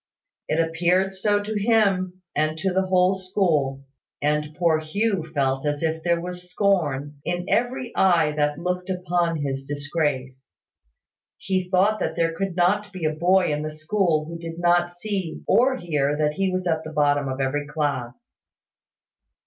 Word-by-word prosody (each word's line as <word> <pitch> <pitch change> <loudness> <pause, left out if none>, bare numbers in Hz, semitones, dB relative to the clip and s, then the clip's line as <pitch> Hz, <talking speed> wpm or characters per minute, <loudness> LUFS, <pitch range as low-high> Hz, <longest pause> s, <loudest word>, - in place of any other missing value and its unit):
It 155 - 0
appeared 175 +4 +1
so 205 +2 +1
to 210 0 -2
him, 190 -5 +2
and 155 +1 0
to 190 +3 -1
the 190 0 +1
whole 185 0 +4
school; 165 -8 0 0.3
and 150 +1 -1
poor 165 -3 +3
Hugh 195 +4 -1
felt 135 -3 0
as 145 +1 -1
if 160 0 -1
there 170 0 +1
was 180 +1 -6
scorn 150 -8 0
in 175 0 -2
every 245 0 -1
eye 170 -5 +4
that 150 -1 0
looked 180 +1 -3
upon 175 -4 0
his 135 -1 -3
disgrace. 145 -2 -3 0.8
He 185 -1 -2
thought 200 +4 +3
there 165 -2 0
could 195 -1 -3
not 205 +4 +2
be 185 -4 -5
a 155 - +1
boy 180 +1 +3
in 150 - -2
the 155 - -3
school 155 0 0
who 170 +1 -7
did 165 0 -7
not 175 0 +3
see 185 -1 -4
or 260 +3 +4
hear 150 - 0
that 150 -1 +1
he 195 +3 0
was 185 0 -2
at 160 -2 0
the 155 - -7
bottom 145 -2 +1
of 130 0 -4
every 145 +2 -1
class. 145 - -3
170 Hz, 165 wpm, -24 LUFS, 150-185 Hz, 0.8 s, whole